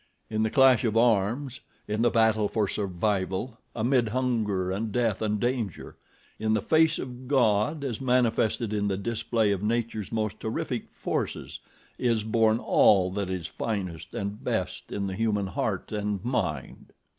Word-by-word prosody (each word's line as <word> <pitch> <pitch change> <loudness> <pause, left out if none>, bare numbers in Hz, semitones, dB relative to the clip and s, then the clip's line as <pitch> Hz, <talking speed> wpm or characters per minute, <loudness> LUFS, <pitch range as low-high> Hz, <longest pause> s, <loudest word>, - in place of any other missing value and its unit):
In 110 0 0
the 110 - +2
clash 130 -1 +5
of 115 -2 +1
arms, 120 +4 +2 0.3
in 105 +1 -1
the 120 - +4
battle 110 -2 +3
for 105 0 0
survival, 100 +4 -2 0.2
amid 120 +1 +2
hunger 105 -6 0
and 105 +3 -2
death 115 -3 0
and 105 -1 0
danger, 120 -6 -2 0.4
in 110 0 +1
the 110 - +1
face 160 0 +3
of 125 0 -7
God 135 +2 +2
as 130 -3 -3
manifested 120 -3 +1
in 105 -1 0
the 95 -1 0
display 110 0 0
of 100 -2 -1
Nature's 110 -2 -2
most 110 -2 -2
terrific 110 - -3
forces, - - -4 0.4
is 115 -3 +1
born 110 0 +3
all 95 -5 +4
that 100 -1 -3
is 90 -3 -3
finest 90 -4 -4
and 100 +1 -4
best - - -3
in 100 - -2
the 95 - -3
human 105 -1 0
heart 95 - -3
and 105 -1 -2
mind." 75 - -3
110 Hz, 155 wpm, -27 LUFS, 100-120 Hz, 0.4 s, clash